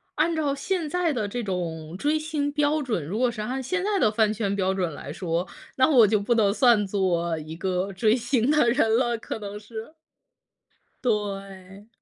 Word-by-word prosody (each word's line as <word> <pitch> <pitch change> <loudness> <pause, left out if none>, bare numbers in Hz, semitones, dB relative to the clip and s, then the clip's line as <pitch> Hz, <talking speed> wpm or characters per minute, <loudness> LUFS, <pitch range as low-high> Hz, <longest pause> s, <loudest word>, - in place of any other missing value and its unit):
按 325 +2 +1
照 290 -3 0
现 335 +1 -2
在 355 -3 0
的 220 -4 -1
这 240 +4 -4
种 170 -4 -4
追 295 +10 +1
星 305 -2 -2
标 295 +1 +1
准 220 - -2
如 200 +8 -3
果 250 -1 +3
是 230 -2 -7
按 255 +5 -3
现 370 +9 -2
在 405 0 +1
的 215 - +3
饭 215 -1 +2
圈 200 -2 -1
标 190 -1 +1
准 185 -3 -1
来 145 - -7
说， 170 0 -2 0.3
那 260 - +4
我 245 -8 +6
就 210 +1 +2
不 205 +4 +1
能 215 -4 +3
算 225 -3 +4
作 175 -4 0
一 155 +1 -7
个 185 +2 -2
追 215 +4 +3
星 245 0 0
的 300 -5 +4
人 225 -3 +3
了， 240 -1 +1
可 - - -5
能 205 -1 -7
是。 220 +6 -9 1.1
对。 195 -3 -3
220 Hz, 210 characters per minute, -25 LUFS, 190-270 Hz, 1.1 s, 我